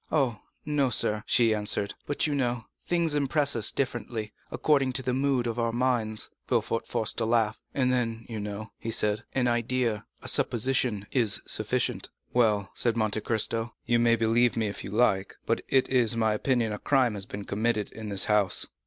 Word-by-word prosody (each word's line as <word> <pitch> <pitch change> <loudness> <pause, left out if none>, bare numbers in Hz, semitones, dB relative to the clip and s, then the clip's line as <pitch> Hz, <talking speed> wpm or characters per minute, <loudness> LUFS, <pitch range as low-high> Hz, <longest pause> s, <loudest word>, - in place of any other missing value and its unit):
"Oh, 135 -8 +1 0.3
no, 145 -3 +1
sir," 105 -2 +2
she 115 -3 +4
answered; 105 -1 -1
"but 145 - 0
you 150 - 0
know, 120 -4 -1 0.2
things 170 -3 +2
impress 145 0 +1
us 110 -2 +2
differently, 120 -4 -3 0.2
according 135 -4 +1
to 130 - -2
the 125 - -1
mood 135 -2 +1
of 120 0 -3
our 115 0 +1
minds." 120 -3 0 0.2
Villefort 115 -1 0
forced 115 -1 0
a - - +1
laugh. 110 -2 +1 0.2
"And 130 -2 +2
then, 115 -2 -1
you 110 -2 -5
know," 105 +1 -6
he 115 - -5
said, 105 -1 +2
"an 125 -2 +2
idea, 120 -2 0 0.2
a - - -7
supposition, 120 -3 +1
is 115 -6 +2
sufficient." - - 0 0.2
"Well," 105 -5 +2
said 115 -1 0
Monte 110 -1 0
Cristo, 115 +1 +1
"you 120 0 +2
may 115 0 +4
believe 115 +1 +2
me 110 - +1
if 105 - -5
you - - -6
like, 100 -3 +1
but - - 0
it 130 -1 +3
is 120 -4 +2
my 110 -1 +2
opinion 115 0 0
that 105 - -3
a - - -18
crime 130 -5 +2
has 100 -2 -5
been 100 0 -7
committed 110 +1 -1
in 110 -1 -7
this 100 -1 0
house." 105 -3 +3
115 Hz, 190 wpm, -27 LUFS, 110-125 Hz, 0.3 s, she